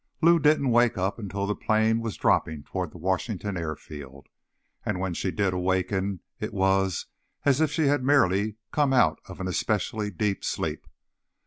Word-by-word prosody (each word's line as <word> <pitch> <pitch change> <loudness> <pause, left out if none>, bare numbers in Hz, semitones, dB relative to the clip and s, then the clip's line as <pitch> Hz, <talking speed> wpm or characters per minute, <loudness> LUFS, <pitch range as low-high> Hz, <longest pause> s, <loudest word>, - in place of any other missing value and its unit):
9 170 - +8
Lou 170 - +3
didn't 150 -3 +3
wake 120 -2 +4
up 95 +4 -1
until 100 -1 -3
the 105 - 0
plane 110 +1 +2
was 115 -2 -4
dropping 80 -3 +1
toward 90 +2 -4
the - - -13
Washington 95 +3 -2
airfield, 75 -4 -7 0.5
and 90 - -2
when 95 -1 -2
she 95 - -2
did 95 0 0
awaken 95 +1 -1 0.2
it - - -4
was 95 -2 +1 0.4
as 140 +1 +4
if 160 - +3
she 160 +2 0
had 140 -2 +2
merely 105 -7 +3 0.2
come 145 -3 +2
out 80 -12 +4
of - - -10
an 95 - -3
especially 105 +3 -1
deep 100 +1 -2
sleep. - - -3
100 Hz, 175 wpm, -26 LUFS, 90-115 Hz, 0.5 s, 9